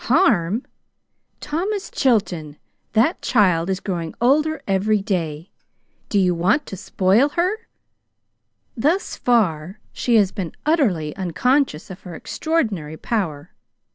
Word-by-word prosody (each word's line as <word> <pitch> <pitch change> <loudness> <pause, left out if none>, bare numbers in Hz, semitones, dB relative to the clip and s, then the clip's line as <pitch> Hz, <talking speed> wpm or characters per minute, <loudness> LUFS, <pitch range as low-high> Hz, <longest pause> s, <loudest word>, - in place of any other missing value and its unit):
"Harm! 220 - +3 0.8
Thomas 380 +7 -3
Chilton, 175 - 0 0.4
that 230 +11 +2
child 185 -7 +2
is 190 -1 -1
growing 170 -5 -4
older 300 +6 +2
every 205 +2 +2
day. 170 -5 -3 0.6
Do 205 - +1
you 185 -2 +3
want 190 - +1
to - - -7
spoil 195 +7 +2
her? 370 +9 -1 1.1
Thus 310 - 0
far 190 -6 0
she 240 - +1
has 200 -4 +4
been 185 -6 -5
utterly 205 - +1
unconscious 195 - 0
of 185 +1 -10
her 175 -3 -9
extraordinary 205 - -2
power. 170 -9 -3
200 Hz, 115 wpm, -21 LUFS, 175-270 Hz, 1.1 s, has